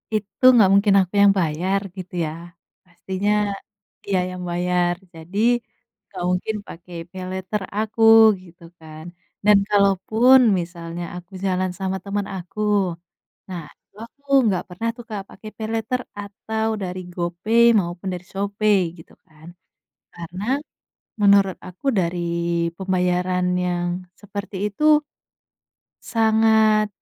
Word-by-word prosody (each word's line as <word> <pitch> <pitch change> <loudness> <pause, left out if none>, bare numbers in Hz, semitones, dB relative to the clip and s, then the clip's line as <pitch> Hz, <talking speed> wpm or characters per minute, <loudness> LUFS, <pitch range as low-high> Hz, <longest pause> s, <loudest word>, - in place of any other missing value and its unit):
itu 210 +3 -5 0.2
gak 195 - +5
mungkin 200 0 +4
aku 185 +1 -1
yang 200 -1 +7
bayar 175 +4 0 0.2
gitu 185 -1 -8
ya, 155 - -4 0.5
pastinya, 190 +3 -3 0.7
dia 195 -2 0
yang 180 0 -7
bayar 175 0 +1 0.2
jadi, 170 +5 -6 0.7
gak - - -7
mungkin 185 +4 -1
pakai 175 +1 -11 0.2
Paylater 190 +2 -4 0.2
aku 220 +1 -3 0.4
gitu 170 -1 -18 0.2
kan 155 0 -11 0.4
dan 210 -1 +7
kalaupun 210 +6 +4 0.2
misalnya 170 0 -6
aku 180 +1 -10
jalan 185 -1 0
sama 190 0 -2
temen 200 0 -3
aku, 180 +3 -9 0.9
nah 175 -3 -5 0.2
itu - - -42
aku 280 +4 -42 0.3
gak 180 - -2
pernah 180 +6 -4
tuh 240 - -10
Kak 210 -2 -4
pakai 215 - -11
Paylater 225 +3 -2 0.2
atau 220 +2 -4 0.2
dari 185 0 -4
GoPay 175 +7 +1 0.2
maupun 175 +1 -5
dari 180 0 -7
Shopee 200 +1 +1 0.2
gitu 160 - -15
kan, 155 +1 -17 0.7
karena, 175 +3 -7 0.8
menurut 200 -2 +5
aku 185 +7 -14
dari 175 0 -1 0.6
pembayaran 180 -1 0 0.2
yang 175 -1 -1 0.3
seperti 205 0 -7
itu 210 +8 -6 1.2
sangat 220 -1 +3
190 Hz, 120 wpm, -22 LUFS, 175-210 Hz, 1.2 s, yang